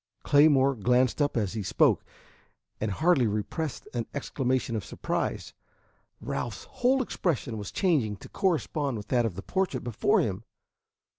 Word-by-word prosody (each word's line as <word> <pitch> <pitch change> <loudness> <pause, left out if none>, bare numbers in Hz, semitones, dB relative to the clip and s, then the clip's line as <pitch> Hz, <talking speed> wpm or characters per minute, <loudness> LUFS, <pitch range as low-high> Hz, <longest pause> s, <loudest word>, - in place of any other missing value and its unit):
Claymore 145 -2 +5
glanced 125 +4 +2
up 145 -3 +1
as 105 -4 0
he 110 - -3
spoke, 95 - +3 0.8
and 110 - -1
hardly 145 - +3
repressed 110 +8 -3
an 120 -2 -2
exclamation 130 -4 -1
of 105 - -2
surprise. - - -3 0.7
Ralph's 120 - -4
whole 260 +2 +1
expression 150 - -2
was 100 - -6
changing 145 - +1
to - - -12
correspond 150 - 0
with 105 -1 -9
that 120 -3 +2
of 95 - -6
the 95 - -7
portrait 190 -9 -1
before 120 +2 +2
him. 100 -1 -1
125 Hz, 145 wpm, -28 LUFS, 110-150 Hz, 0.8 s, Claymore